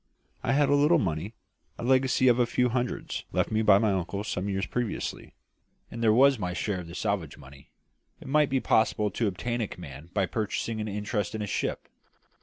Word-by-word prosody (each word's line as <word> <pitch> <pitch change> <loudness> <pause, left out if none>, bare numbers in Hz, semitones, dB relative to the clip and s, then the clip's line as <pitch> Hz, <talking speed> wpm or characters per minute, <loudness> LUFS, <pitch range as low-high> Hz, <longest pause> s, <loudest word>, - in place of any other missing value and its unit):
I 120 - 0
had 145 +1 +3
a - - +4
little 145 +4 +5
money 95 +4 -2 0.4
a - - -7
legacy 130 0 +3
of 120 0 +5
a 120 - +3
few 125 +1 +1
hundreds 125 +1 -3
left - - 0
me 110 0 +2
by 105 -3 +6
an 105 - 0
uncle 100 -1 -1
some 100 -1 -3
years 95 0 -1
previously; 120 -3 -4 0.6
and 115 - -6
there 110 -2 +4
was 135 +2 +5
my 90 -3 -2
share 95 +1 -2
of 85 - -8
the 85 - -9
salvage 100 -8 -2
money: 70 0 -15 0.5
it - - -12
might 150 +1 +3
be 135 - +1
possible 105 -3 +2
to 115 +3 0
obtain 120 +5 -2
a 110 - -1
command 75 -2 -10
by 95 -1 +1
purchasing 110 +2 -3
an 105 - -3
interest 105 -1 -2
in 110 - -3
a - - -2
ship! 100 - -3
110 Hz, 210 wpm, -27 LUFS, 95-125 Hz, 0.6 s, by